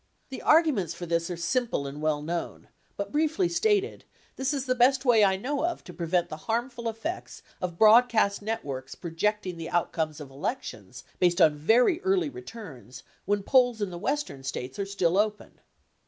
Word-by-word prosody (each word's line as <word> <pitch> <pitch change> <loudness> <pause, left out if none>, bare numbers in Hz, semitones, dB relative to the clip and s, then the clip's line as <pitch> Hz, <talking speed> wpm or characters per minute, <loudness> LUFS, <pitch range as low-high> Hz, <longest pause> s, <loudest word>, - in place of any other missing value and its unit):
The 265 - -7
arguments 275 - +3
for 175 - -6
this 170 0 -1
are 175 - -4
simple 225 - -1
and 140 +2 -7
well 155 -1 0
known; 170 +2 -5 0.3
but 200 - -4
briefly 315 +4 +1
stated, 415 +4 0 0.3
this 265 +1 -1
is 275 -3 -2
the 255 - +1
best 260 +2 +3
way 230 -4 +5
I 190 -1 +3
know 275 +8 -2
of 345 0 -2
to 180 - -11
prevent 170 +1 0
the 155 - -7
harmful 235 0 -1
effects 305 +11 -6 0.2
of 175 -2 -4
broad 225 +4 +7
cast 205 -4 +1
networks 145 -12 -4
projecting 185 +2 -2
the 165 0 -6
outcome 165 -2 0
of 150 -3 -11
elections, 155 - -5 0.2
based 175 -1 +3
on 155 - +6
very 245 - +3
early 380 -6 +1
returns, 170 - -10 0.2
when 205 +1 0
polls 245 -1 +3
in 205 -3 -2
the 175 - -7
Western 290 - -2
States 130 +1 -5
are 200 - -2
still 190 -2 +1
open. 210 0 -2
205 Hz, 180 wpm, -27 LUFS, 170-255 Hz, 0.3 s, broad